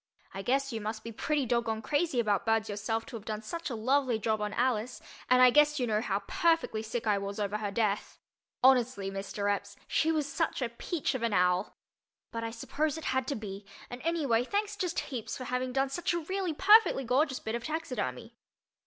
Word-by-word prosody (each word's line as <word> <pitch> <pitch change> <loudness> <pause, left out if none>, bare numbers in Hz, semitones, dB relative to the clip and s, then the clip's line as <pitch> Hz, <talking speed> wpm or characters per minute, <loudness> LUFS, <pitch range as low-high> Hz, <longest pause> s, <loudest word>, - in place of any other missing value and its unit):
I 195 - -4
guess 270 +4 0
you 225 - -3
must 215 +1 -4
be 230 - -6
pretty 285 +5 0
dog 235 0 +1
goned 220 -1 -2
crazy 290 -1 +1
about 210 -4 +1
birds 225 -1 +1
yourself 215 +2 -2
to 245 - -9
have 210 - -12
done 215 0 -4
such 335 +8 -4
a 245 - -3
lovely 255 +1 +2
job 220 0 -1
on 210 0 -1
Alice, 245 0 0 0.3
and 255 0 +6
I 250 - +8
guess 295 +2 +4
you 250 - +1
know 215 -2 +1
how 200 -2 -1
perfectly 330 -10 +1
sick 225 +2 -4
I 205 -2 +2
was 200 +1 -5
over 205 0 -1
her 210 -1 -2
death. 205 0 -1 0.5
Honestly, 250 -6 +4
Mr. 200 +1 -1
Epps, 200 0 -9
she 320 - +2
was 305 -3 0
such 325 +3 -1
a 250 -3 -1
peach 290 +7 -2
of 260 - -3
an 230 -2 0
owl. 180 +1 +2 0.6
But 230 0 -4
I 230 - -2
suppose 285 +6 -2
it 320 - -7
had 260 -1 0
to 285 - -1
be, 205 -2 -7 0.3
and 245 +1 -7
anyway, 290 -8 +1
thanks 410 +8 -1
just 360 -4 -1
heaps 245 -6 -5
for 255 - -6
having 250 0 -2
done 270 +1 +1
such 345 +4 -1
a - - 0
really 365 0 -2
perfectly 415 -5 +6
gorgeous 260 +3 +1
bit 220 - -4
of 235 0 -3
taxidermy. 255 -7 -3
240 Hz, 215 wpm, -30 LUFS, 215-285 Hz, 0.6 s, I